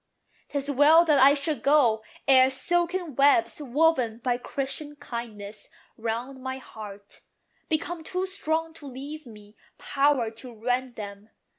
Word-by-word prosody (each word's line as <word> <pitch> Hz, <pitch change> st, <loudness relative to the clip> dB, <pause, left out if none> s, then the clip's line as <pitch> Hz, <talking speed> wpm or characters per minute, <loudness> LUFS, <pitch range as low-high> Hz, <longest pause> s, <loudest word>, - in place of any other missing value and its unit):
'Tis 285 Hz, 0 st, -2 dB
well 305 Hz, +5 st, +6 dB
that 300 Hz, -4 st, +4 dB
I 275 Hz, +2 st, +7 dB
should 295 Hz, +1 st, -2 dB
go, 265 Hz, -7 st, +4 dB, 0.3 s
ere 260 Hz, -1 st, +7 dB
silken 345 Hz, +2 st, -1 dB
webs, 285 Hz, +4 st, +3 dB
Woven 265 Hz, -4 st, +2 dB
by 245 Hz, 0 st, -1 dB
Christian 280 Hz, +3 st, -5 dB
kindness 220 Hz, -7 st, -8 dB, 0.3 s
round 235 Hz, +4 st, -4 dB
my 260 Hz, 0 st, -4 dB
heart, 205 Hz, -5 st, -11 dB, 0.5 s
Become 325 Hz, +1 st, -2 dB
too 365 Hz, +3 st, -2 dB
strong 325 Hz, -4 st, -2 dB
to 295 Hz, -3 st, -12 dB
leave 280 Hz, +3 st, -8 dB
me 210 Hz, -1 st, -14 dB, 0.2 s
power 275 Hz, -5 st, +1 dB
to 230 Hz, +1 st, -11 dB
rend 245 Hz, +2 st, -2 dB
them. 205 Hz, 0 st, -9 dB
270 Hz, 135 wpm, -26 LUFS, 235-305 Hz, 0.5 s, I